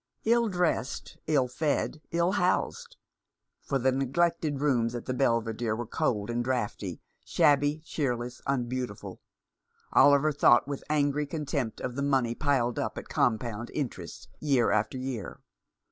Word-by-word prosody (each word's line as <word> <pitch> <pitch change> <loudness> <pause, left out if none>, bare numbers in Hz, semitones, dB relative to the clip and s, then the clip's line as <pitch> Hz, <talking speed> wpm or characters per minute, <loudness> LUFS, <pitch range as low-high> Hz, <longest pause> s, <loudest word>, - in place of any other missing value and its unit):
Ill 235 0 +3
dressed, 175 - -1
ill 140 -5 +3
fed, 150 +3 -1
ill 170 +2 +1
housed 465 - -1 0.3
— - - -58
for 140 - +1
the 130 0 +2
neglected 145 +3 0
rooms 125 -5 +1
at 120 - -5
the 130 - -2
Belvidere 115 -3 0
were 120 +2 -4
cold 110 -5 -1
and 120 +1 -1
draughty, 110 -7 -2 0.2
shabby, 145 +1 +3
cheerless, 125 -5 -3
unbeautiful 125 -4 -3 0.4
— - - -26
Oliver 145 +2 +6
thought 125 -3 +4
with 140 -1 -5
angry 145 -1 +1
contempt 145 -6 -3
of 125 - -4
the 140 - -2
money 135 -4 +1
piled 125 -3 0
up - - -3
at - - -7
com 110 -3 +2
pound 115 0 -6
interest 105 - -5
year 135 -6 +2
after 105 +4 0
year. 130 -5 -5
130 Hz, 145 wpm, -28 LUFS, 120-150 Hz, 0.4 s, Oliver